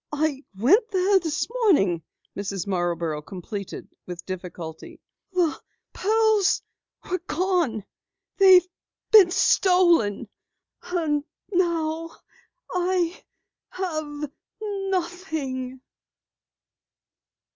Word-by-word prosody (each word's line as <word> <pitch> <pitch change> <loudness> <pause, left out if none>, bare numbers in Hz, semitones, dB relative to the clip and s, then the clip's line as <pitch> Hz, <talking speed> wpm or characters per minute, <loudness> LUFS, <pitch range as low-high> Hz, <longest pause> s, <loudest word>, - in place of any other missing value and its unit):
"I 300 -2 -1
went 395 - +4
there 385 0 +3
this 320 -4 -2
morning," 195 - +3 0.3
Mrs. 195 -2 -3
Marborough 170 -5 -1
completed 195 +4 -7 0.2
with 175 -1 -7
difficulty. 175 -3 -7 0.3
"The 355 -4 0 0.3
pearls 435 -1 +2 0.4
were 365 0 -1
gone. 340 - 0 0.5
They've 375 -2 +7 0.4
been 410 -5 +9
stolen. 345 - +3 1.2
Now 330 -3 0 0.6
I 360 -1 0 0.5
have 310 -5 -4 0.3
nothing." 345 -10 -3
325 Hz, 70 wpm, -25 LUFS, -, 1.2 s, been